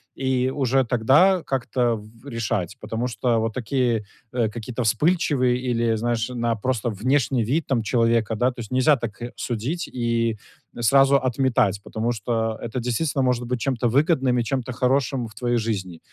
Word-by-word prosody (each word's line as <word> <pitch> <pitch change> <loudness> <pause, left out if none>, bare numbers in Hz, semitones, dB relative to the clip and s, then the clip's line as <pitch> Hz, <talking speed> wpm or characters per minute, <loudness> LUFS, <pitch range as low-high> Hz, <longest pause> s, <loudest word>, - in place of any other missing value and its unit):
и 130 -1 0
уже 135 -1 +2
тогда 135 - +4
как-то 125 -2 0
в 110 +5 -13
решать. 110 -6 -2
Потому 115 +2 -3
что 120 -1 0
вот 110 0 -1
такие, 120 -2 0 0.3
э, 115 -4 +1
какие-то 120 +3 -5
вспыльчивые 130 - +2
или, 115 -1 +1
знаешь, 115 0 -1
на 120 -2 -1
просто 120 0 -1
внешний 125 +3 +1
вид 145 +9 -1
там 120 -5 0
человека, 115 -1 +1
да? 125 +4 +2
То 120 - -13
есть, 110 - -9
нельзя 130 +3 +4
так, 115 -2 -6
э, 120 - -5
судить 125 +9 -3
и 115 -2 0 0.4
н 120 - -6
сразу 135 +3 +5
отметать, 125 -6 +1
потому 115 +2 -2
что 115 0 -2
это 120 +2 -4
действительно 130 +4 -1
может 125 -1 +1
быть 125 0 -1
чем-то 120 0 -1
выгодным 135 -1 +2
и 120 - +1
чем-то 130 +1 -2
хорошим 130 0 0
в 110 - -14
твоей 120 +2 -1
жизни. 95 -7 -3
120 Hz, 170 wpm, -23 LUFS, 115-130 Hz, 0.4 s, сразу